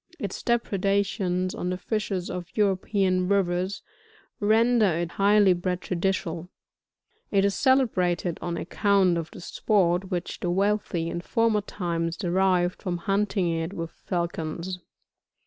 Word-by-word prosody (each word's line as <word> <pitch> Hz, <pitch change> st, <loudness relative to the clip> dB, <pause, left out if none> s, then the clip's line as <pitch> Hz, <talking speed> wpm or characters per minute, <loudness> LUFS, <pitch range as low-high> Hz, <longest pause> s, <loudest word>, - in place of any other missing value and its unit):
Its -, -, -5 dB
depredations 195 Hz, -5 st, 0 dB
on 180 Hz, -, -3 dB
the 180 Hz, -, -2 dB
fishes 200 Hz, -3 st, -2 dB
of 180 Hz, -2 st, -5 dB
European 190 Hz, -2 st, +1 dB
rivers, 185 Hz, 0 st, 0 dB, 0.6 s
render 225 Hz, +1 st, +4 dB
it 170 Hz, 0 st, -2 dB
highly 200 Hz, -1 st, +4 dB
prejudicial; 180 Hz, -1 st, -2 dB, 0.8 s
it 200 Hz, -1 st, +3 dB
is 200 Hz, -, +2 dB
celebrated 185 Hz, -9 st, +1 dB
on 170 Hz, -1 st, -3 dB
account 195 Hz, 0 st, +2 dB
of 165 Hz, -1 st, -3 dB
the -, -, -11 dB
sport 180 Hz, 0 st, +1 dB
which 180 Hz, -2 st, -3 dB
the 175 Hz, -, -2 dB
wealthy 195 Hz, -2 st, 0 dB
in 170 Hz, -, -3 dB
former 225 Hz, +2 st, +1 dB
times, 170 Hz, -4 st, -3 dB
derived 180 Hz, -1 st, +1 dB
from 180 Hz, -3 st, -2 dB
hunting 195 Hz, +1 st, 0 dB
it 165 Hz, +2 st, -2 dB
with 165 Hz, -2 st, -5 dB
fidcons. 170 Hz, 0 st, -4 dB
185 Hz, 125 wpm, -26 LUFS, 175-200 Hz, 0.8 s, render